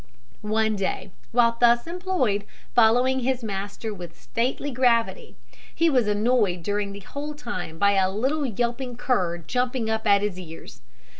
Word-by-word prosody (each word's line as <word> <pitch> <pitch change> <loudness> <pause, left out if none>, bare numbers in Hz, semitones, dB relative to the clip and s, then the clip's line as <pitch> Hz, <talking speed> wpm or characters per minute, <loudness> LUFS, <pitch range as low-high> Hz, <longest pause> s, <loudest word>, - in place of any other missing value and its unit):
One 220 0 +1
day 195 -1 -3 0.2
while 235 -1 +3
thus 240 0 +4
employed, 335 - -1 0.3
following 245 +3 +4
his 255 0 -1
master 205 +1 -4
with 175 -4 -10
stately 260 +4 -2
gravity, 250 - +1 0.4
he 330 -1 +3
was 250 -5 +2
annoyed 210 -4 +1
during 205 +1 -1
the 200 0 -8
whole 290 +8 -6
time 210 - -6
by 200 +4 +4
a 190 -2 +3
little 265 +9 0
yelping 240 +2 -2
cur 200 -9 0
jumping 245 +5 -1
up 220 0 -1
at 200 0 +5
his 200 -3 -2
ears. 165 -3 -10
230 Hz, 150 wpm, -25 LUFS, 200-255 Hz, 0.4 s, at